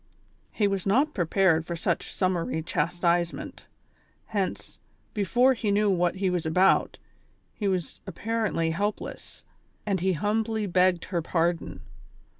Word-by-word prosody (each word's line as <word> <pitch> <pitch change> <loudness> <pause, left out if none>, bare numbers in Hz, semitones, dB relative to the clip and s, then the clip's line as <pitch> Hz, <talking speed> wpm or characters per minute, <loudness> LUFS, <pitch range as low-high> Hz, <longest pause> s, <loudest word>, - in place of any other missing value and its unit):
He 210 - +1
was 195 -1 -2
not 275 +10 +3
prepared 175 -2 +2
for 170 +1 -5
such 165 - -2
summary 175 -4 -1
chastisement, 170 +2 -1 0.6
hence, 200 -4 -3 0.3
before 240 +6 +3
he 225 -4 -2
knew 205 0 +3
what 175 -1 +1
he 190 0 -1
was 175 -2 -1
about, 180 +4 +3 0.6
he 205 - -3
was 185 -4 -2
appa 190 +4 -8 0.2
rently 165 -2 0
helpless; 205 +5 -4 0.4
when 195 -3 0
he 190 +2 +1
humbly 215 +5 -1
begged 180 -2 +2
her 175 -3 -2
pardon 170 0 -1
185 Hz, 130 wpm, -27 LUFS, 170-205 Hz, 0.6 s, not